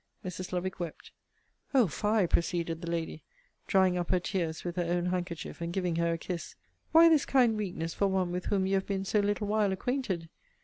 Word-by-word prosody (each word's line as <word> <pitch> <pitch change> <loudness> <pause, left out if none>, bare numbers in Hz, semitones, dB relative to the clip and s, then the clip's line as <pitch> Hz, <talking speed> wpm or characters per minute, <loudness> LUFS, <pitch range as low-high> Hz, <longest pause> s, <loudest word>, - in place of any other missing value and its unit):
Mrs. 185 0 -5
Lovick 185 +1 -3
wept. 170 -3 -6 0.6
O 255 -4 +6
fie! 210 +3 +1
proceeded 170 -1 0
the 170 - -5
Lady, 165 -2 -3 0.5
drying 185 -2 +3
up 175 - -3
her 185 - +3
tears 170 -3 -2
with 175 -1 -4
her - - +2
own 175 +1 0
handkerchief, 175 -2 -3
and 170 0 -2
giving 180 -2 -1
her 170 0 +2
a - - -2
kiss 170 +1 -5 0.4
Why 330 +1 +8
this 315 -4 +5
kind 245 -5 +3
weakness 175 -6 -3
for 200 - +1
one 190 -2 0
with 180 +1 -3
whom 195 -2 +1
you 190 - 0
have 195 0 +1
been 195 -1 -2
so 210 - +2
little 205 +1 0
while 210 -1 +2
acquainted? 190 -5 -2
185 Hz, 205 wpm, -30 LUFS, 170-205 Hz, 0.6 s, Why